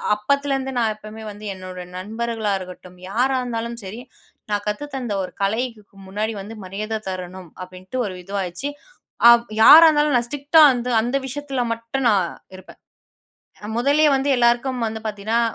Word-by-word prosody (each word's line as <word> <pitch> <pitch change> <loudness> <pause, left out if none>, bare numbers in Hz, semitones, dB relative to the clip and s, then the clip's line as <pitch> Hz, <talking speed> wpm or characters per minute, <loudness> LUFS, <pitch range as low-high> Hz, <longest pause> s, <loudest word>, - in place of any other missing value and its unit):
அப்பத்துலருந்து 270 +4 -1
நான் 225 -2 +1
எப்போவுமே 215 +1 -11
வந்து, 210 +1 -11
என்னோட 185 -1 -9 0.2
நண்பர்களா 220 +2 -3
இருக்கட்டும், 180 0 -11
யாரா 255 +5 +1
இருந்தாலும் 235 -1 -4
சரி, 205 +5 -7 0.5
நான் 205 0 0
கத்து 210 +8 -2
தந்த 245 -5 -3
ஒரு - - -7
கலைக்கு 225 +3 -1 0.3
முன்னாடி 210 +3 -2
வந்து 205 +3 -9
மரியாத 210 +4 -4
தரணும். 185 -1 -7
அப்படின்ட்டு 185 +6 -9
ஒரு 195 - -4
இதுவாச்சு. 195 +6 -4 0.6
ஆ - - +11 0.3
யாரா 325 +7 +10
இருந்தாலும், 295 -2 +2
நான் 240 0 -1
ஸ்ட்ரிக்ட்டா 290 +4 +3
வந்து, 245 0 -3
அந்த 245 +4 0
விஷயத்தில 270 -1 -3
மட்டும் 230 +3 -2
நான் 190 -5 +2 0.3
இருப்பேன். 185 - -15 1.0
முதல்லயே 290 +5 +3
வந்து 270 +1 -1
எல்லாருக்கும் 240 +1 +1
வந்து 220 0 -6
பாத்தீங்கனா, 215 +2 -1
225 Hz, 145 wpm, -21 LUFS, 200-260 Hz, 1.0 s, ஆ